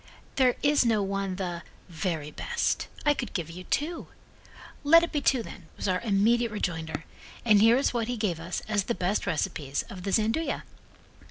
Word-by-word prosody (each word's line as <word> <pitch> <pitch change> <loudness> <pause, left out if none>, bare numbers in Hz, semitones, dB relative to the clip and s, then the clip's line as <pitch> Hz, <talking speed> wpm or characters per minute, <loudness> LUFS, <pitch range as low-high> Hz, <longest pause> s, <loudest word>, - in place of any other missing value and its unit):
"There 255 -2 +4
is 290 -1 +4
no 220 -4 +2
one 195 -1 -2
the 175 -3 -4 0.3
'very 160 -3 -3
best'. 475 - -1 0.2
I 295 - +5
could 250 -4 -5
give 165 -3 -3
you 180 +2 -9
two." 325 +3 -2 0.8
"Let 330 +3 +7
it 340 - -2
be 295 - 0
two, 260 -3 +2
then," 180 -5 -11
was - - -3
our 185 -1 +1
immediate 230 +2 +2
rejoinder, 165 -6 -3 0.4
and 210 -3 +6
here 225 +3 +6
is 275 - +1
what 230 -2 -1
he 245 0 -2
gave 195 -7 -1
us 170 +2 -4
as 205 -3 0
the 235 - -1
best 190 +3 -1
recipes 150 -4 -1
of 185 - -8
the 195 - -3
Gianduja. 225 +11 +1
205 Hz, 185 wpm, -28 LUFS, 180-245 Hz, 0.8 s, Let